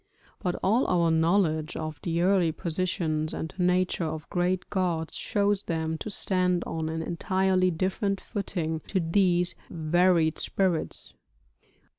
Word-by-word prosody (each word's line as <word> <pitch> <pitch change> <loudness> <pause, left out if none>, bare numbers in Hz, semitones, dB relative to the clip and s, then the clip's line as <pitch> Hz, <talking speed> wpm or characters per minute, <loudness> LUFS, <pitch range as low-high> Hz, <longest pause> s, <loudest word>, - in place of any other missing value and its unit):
But 180 -1 -2
all 225 +7 +3
our 170 -2 +2
knowledge 160 -1 +1
of 155 -1 -5
the 170 0 -1
early 185 -3 +3
positions 160 -2 -1
and 160 - -5
nature 180 0 +1
of 155 -1 -4
great 180 0 0
gods 175 -4 -1
shows 205 -1 0
them 160 -3 -3
to - - -5
stand 180 -3 +3
on 160 -1 -3
an 160 0 -3
entirely 185 +2 +1
different 190 +3 -1
footing 175 -7 -3
to 190 - 0
these 175 0 +2 0.2
varied 170 0 +2
spirits. 185 -5 -1
175 Hz, 130 wpm, -27 LUFS, 160-185 Hz, 0.2 s, all